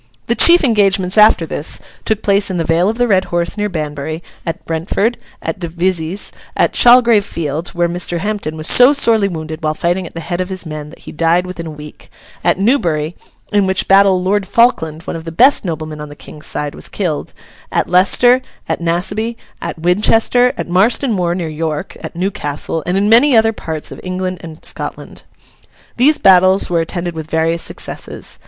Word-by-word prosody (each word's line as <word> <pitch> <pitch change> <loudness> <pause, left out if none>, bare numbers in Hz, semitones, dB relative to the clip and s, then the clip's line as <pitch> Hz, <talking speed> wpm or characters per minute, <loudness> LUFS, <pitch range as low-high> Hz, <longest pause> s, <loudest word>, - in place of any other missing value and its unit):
The - - +1
chief 345 0 +6
engagements 195 -6 +2
after 210 -5 +5
this, 155 -1 -3 0.3
took 220 -1 -1
place 200 0 +2
in 185 - -2
the 165 - 0
vale 165 +4 +2
of 225 - -3
the 245 0 +2
Red 190 -4 +2
Horse 170 -1 -2
near 210 -1 -2
Banbury, 155 -1 -5 0.2
at 165 - -4
Brentford, 180 +8 -1 0.3
at 200 - -4
Devizes, 175 +1 -2 0.3
at - - +2
Chalgrave 240 -3 +5
Field 160 -2 -4
(where 175 0 +1
Mr. 175 0 -2
Hampden 200 -4 -3
was 155 - -4
so 250 - +6
sorely 225 -7 +3
wounded 160 -3 -6
while 155 -1 -1
fighting 175 +2 -1
at - - -15
the - - -4
head 175 +2 -3
of 185 - -4
his 185 -1 -3
men, 155 -1 -7
that - - -14
he - - -8
died 170 +3 +1
within 175 -2 -7
a - - -5
week), 150 -1 -12 0.3
at - - +2
Newbury 175 - 0 0.4
(in 205 -2 +3
which 190 0 -1
battle 195 -1 +4
Lord 195 +1 0
Falkland, 165 -10 +1
one - - -5
of 165 - -6
the 165 - -7
best 255 - +4
noblemen 155 -4 -5
on 150 - -8
the 145 - -11
King's 150 +1 -11
side, 150 0 -3
was - - -7
killed), 170 -7 -3 0.4
at - - 0
Leicester, 245 +8 +4 0.3
at - - -2
Naseby, 200 +7 -1 0.3
at - - -5
Winchester, 220 +8 +3
at - - -4
Marston 220 +8 +2
Moor 175 -3 0
near 175 -3 -3
York, 155 -1 -4
at - - -8
Newcastle, 165 -4 -3
and 180 +2 0
in 200 +1 +1
many 240 +4 +5
other 225 0 +3
parts 160 -7 -5
of - - -9
England 185 0 -4
and 160 -1 -10
Scotland. - - -6 0.8
These 290 +5 +4
battles 185 0 +4
were 170 -1 +2
attended 175 +1 -4
with 160 -1 -7
various 165 +1 0
successes. - - -6
180 Hz, 190 wpm, -16 LUFS, 160-205 Hz, 0.8 s, chief